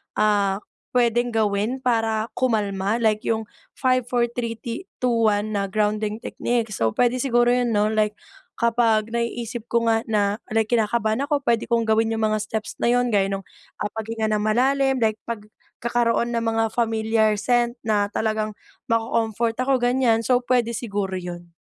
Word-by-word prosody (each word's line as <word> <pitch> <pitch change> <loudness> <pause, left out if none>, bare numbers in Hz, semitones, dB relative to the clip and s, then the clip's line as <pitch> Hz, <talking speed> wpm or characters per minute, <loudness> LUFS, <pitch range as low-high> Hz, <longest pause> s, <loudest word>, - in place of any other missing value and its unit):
ah, 205 -1 +2 0.3
puwedeng 240 0 +2
gawin 220 +1 0
para 225 -3 +1
kumalma, 210 -4 0
like 215 -2 +1
yung, 225 -1 -1 0.3
five, 255 -1 +2
four, 245 -1 +2
three, 235 -1 -4
ti 235 - -6
two, 230 -3 +2
one, 210 +1 -1
na 200 -1 -1
grounding 210 +1 0
techniques. 230 -2 -2
So, 115 - +4
puwede 245 +1 +2
siguro 240 -2 +3
'yun, 245 -1 +2
'no, 210 +1 +2
like 215 -1 +1 0.4
kapag 230 -2 +2
naiisip 235 0 -3
ko 235 0 +1
nga 225 -1 +3
na, 205 0 +1
like, 220 0 +2
kinakabahan 220 +1 +1
ako 285 -2 0
puwede 230 -3 +1
kong 230 -1 +2
gawin 220 0 +2
'yung 225 -1 0
mga 215 -1 0
steps 215 0 -4
na - - +3
'yun, 245 -1 +2
gaya 195 -1 +3
nung 195 -1 -4 0.5
paghinga 220 0 -3
ng 210 - +1
malalim, 265 +5 +2
like 220 -3 0
pagkakaroon 235 +2 -2
ng 230 - 0
mga 225 0 +1
familiar 220 -2 +1
scent 240 +3 +1
na 205 -2 +1
talagang 215 0 -2 0.3
maco-comfort 230 0 0
ako 265 +1 +2
ganyan. 245 -2 +2
So, 250 +2 +3
puwede 245 -2 +1
siguro 205 -4 -3
'yun. 175 -2 -6
225 Hz, 160 wpm, -23 LUFS, 215-240 Hz, 0.5 s, So